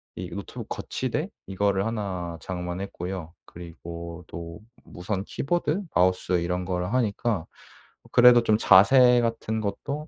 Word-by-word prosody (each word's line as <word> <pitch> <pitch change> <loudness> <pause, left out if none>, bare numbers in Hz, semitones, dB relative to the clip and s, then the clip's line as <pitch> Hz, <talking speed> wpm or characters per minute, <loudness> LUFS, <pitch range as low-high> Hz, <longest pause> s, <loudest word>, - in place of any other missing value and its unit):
이 - - -6
노트북 - - -8
거치대? - - -3 0.2
이거를 95 0 0
1 95 -7 -3
장만했고요. 90 -1 -5
그리고 85 0 -9
또 85 +3 -8 0.2
무선 95 +2 -4
키보드 175 - -1
마우스 90 0 +2
이런 90 +1 -2
거를 90 +2 -2
하니까 110 -5 0 0.7
그래도 120 0 +8
좀 110 -2 +3
자세 125 +6 +6
같은 115 -1 -2
것도 140 +9 -4
95 Hz, 260 characters per minute, -26 LUFS, 90-115 Hz, 0.7 s, 그래도